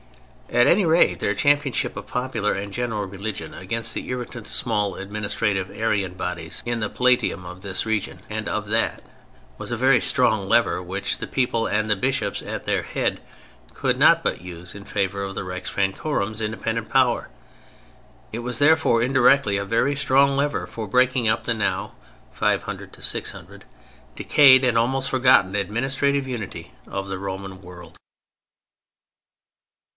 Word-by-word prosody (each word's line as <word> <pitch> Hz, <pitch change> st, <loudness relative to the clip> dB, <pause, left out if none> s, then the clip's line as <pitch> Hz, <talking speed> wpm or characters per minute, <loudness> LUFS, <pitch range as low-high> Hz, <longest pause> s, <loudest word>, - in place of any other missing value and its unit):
At 120 Hz, -, +4 dB
any 200 Hz, +3 st, +4 dB
rate, 165 Hz, +1 st, +4 dB
their -, -, 0 dB
championship 145 Hz, -3 st, +2 dB
of -, -, -7 dB
popular 125 Hz, -5 st, -1 dB
and 100 Hz, 0 st, -5 dB
general 115 Hz, -4 st, -2 dB
religion 100 Hz, +2 st, -6 dB
against 110 Hz, +4 st, -2 dB
the -, -, -5 dB
irritant, 125 Hz, -2 st, -5 dB
small, 105 Hz, -2 st, -1 dB
administrative 100 Hz, -1 st, -2 dB
Arian 100 Hz, -4 st, -1 dB
bodies 85 Hz, -3 st, -4 dB
in 120 Hz, -1 st, -2 dB
the 105 Hz, -, -1 dB
Palatium 125 Hz, -8 st, +1 dB
of 90 Hz, +1 st, -9 dB
this 95 Hz, +1 st, -3 dB
region 110 Hz, -3 st, -2 dB
and 110 Hz, 0 st, -3 dB
of 105 Hz, 0 st, -3 dB
that, 110 Hz, +2 st, 0 dB, 0.6 s
was -, -, -6 dB
a -, -, -1 dB
very -, -, +4 dB
strong -, -, +2 dB
lever -, -, +3 dB
which -, -, -3 dB
the -, -, -5 dB
people 120 Hz, -3 st, 0 dB
and 110 Hz, +1 st, 0 dB
the 105 Hz, -, +4 dB
Bishops 120 Hz, -2 st, -1 dB
at -, -, -6 dB
their -, -, 0 dB
head -, -, -2 dB, 0.5 s
could -, -, 0 dB
not -, -, +5 dB
but -, -, -1 dB
use 90 Hz, 0 st, -8 dB
in 100 Hz, -, -9 dB
favor 100 Hz, -1 st, -2 dB
of 95 Hz, 0 st, -5 dB
the -, -, -3 dB
Rex 90 Hz, 0 st, -5 dB
Francorum's 105 Hz, +2 st, -2 dB
independent 110 Hz, +1 st, -3 dB
power. 125 Hz, -3 st, +2 dB, 1.0 s
It 115 Hz, -, -3 dB
was, 120 Hz, 0 st, -2 dB
therefore, 145 Hz, -6 st, +4 dB
indirectly, 130 Hz, -3 st, +4 dB
a 100 Hz, -, -1 dB
very 115 Hz, +7 st, +1 dB
strong 140 Hz, 0 st, +3 dB
lever 145 Hz, +1 st, 0 dB
for 110 Hz, -2 st, -6 dB
breaking 125 Hz, +1 st, +2 dB
up 110 Hz, -, 0 dB
the 115 Hz, -, +1 dB
now 110 Hz, -3 st, -2 dB, 0.4 s
(500 -, -, -2 dB
600) -, -, -5 dB, 0.5 s
decayed 130 Hz, -3 st, +6 dB
and 120 Hz, -2 st, +2 dB
almost 130 Hz, +3 st, +1 dB
forgotten 125 Hz, -7 st, +4 dB
administrative 135 Hz, +7 st, 0 dB
unity 120 Hz, -6 st, -6 dB
of 100 Hz, 0 st, -4 dB
the 95 Hz, -1 st, -4 dB
Roman 95 Hz, -1 st, -6 dB
world. 90 Hz, -2 st, -12 dB
110 Hz, 155 wpm, -23 LUFS, 100-125 Hz, 1.0 s, decayed